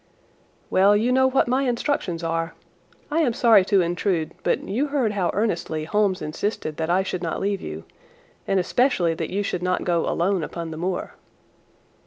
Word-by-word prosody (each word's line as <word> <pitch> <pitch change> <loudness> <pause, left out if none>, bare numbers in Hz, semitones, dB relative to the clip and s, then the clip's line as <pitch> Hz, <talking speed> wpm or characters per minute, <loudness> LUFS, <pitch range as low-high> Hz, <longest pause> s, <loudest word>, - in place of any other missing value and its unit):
"Well, 200 +2 +5
you 230 +4 +1
know 260 +1 +4
what 260 -1 +2
my 255 +2 +2
instructions 235 - -1
are. 165 0 -2 0.6
I 315 - +1
am 270 -8 +2
sorry 225 -5 +5
to 195 -1 +3
intrude, 175 -1 -1
but - - 0
you 245 +10 0
heard 275 -6 0
how 195 -4 0
earnestly 170 -7 -1
Holmes 200 +2 0
insisted 155 0 -3
that 160 0 -2
I 185 +2 +3
should 185 -2 -4
not 165 -2 -2
leave 200 -1 -1
you, 75 +1 -6 0.6
and 195 - +2
especially 185 -3 +2
that 160 -1 -4
you 200 +2 -1
should 180 -3 -3
not 180 0 0
go 170 -2 0
alone 185 +2 +1
upon 165 +1 -5
the 155 - -6
moor." 180 +3 -3
190 Hz, 180 wpm, -23 LUFS, 170-220 Hz, 0.6 s, Well